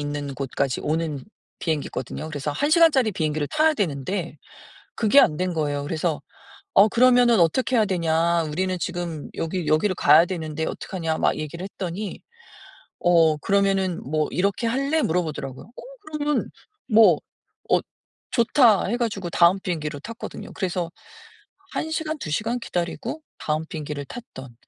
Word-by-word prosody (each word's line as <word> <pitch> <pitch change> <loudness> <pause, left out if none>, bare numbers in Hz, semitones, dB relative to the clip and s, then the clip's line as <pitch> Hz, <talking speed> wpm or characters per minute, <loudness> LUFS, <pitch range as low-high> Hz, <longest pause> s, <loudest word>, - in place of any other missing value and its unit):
있는 145 -1 -4
곳까지 135 -1 -2
오는 155 -2 -2 0.4
비행기거든요. 155 -1 -3
그래서 145 -1 -3
1 290 - 0
시간짜리 310 - +5
비행기를 155 -3 -1
타야 310 0 +3
되는데 170 - -2 0.6
그게 230 +5 +5
안 155 - +4
된 180 -1 -1
거예요. 145 -3 -1
그래서 155 +1 -1 0.5
"어 200 +2 +7
그러면은 245 0 +5
어떻게 250 +10 +2
해야 220 -3 +4
되냐 170 -2 +1
우리는 180 +4 -2
지금 170 -4 -4
여기 165 +1 -3
여기를 185 +5 +2
가야 155 +2 +6
되는데 160 -3 -4
어떡하냐." 165 -4 -3
막 - - +2
얘기를 155 +3 -6
했더니 190 +1 -5 0.8
"어 165 -3 +4
그러면은 195 0 +1
뭐 155 +3 0
이렇게 200 +5 0
할래?" 275 +7 +1
물어보더라고요. 155 - -2
어 - - -11 0.2
그러면 295 -3 -2 0.4
뭐 210 - +6 0.5
"어 - - +5 0.5
좋다." 235 -4 +4
해 235 - 0
가지고 200 -7 -2
다음 170 +3 +4
비행기로 155 -6 -3
탔거든요. 230 +9 -8
그래서 180 -2 -2 0.8
1 315 - -3
시간, 315 -1 -2
2 170 - -6
시간 225 +9 -1
기다리고 180 - -4 0.2
다음 155 +1 -2
비행기를 150 -2 -5
탔던. 130 - -10
175 Hz, 330 characters per minute, -24 LUFS, 155-220 Hz, 0.8 s, 어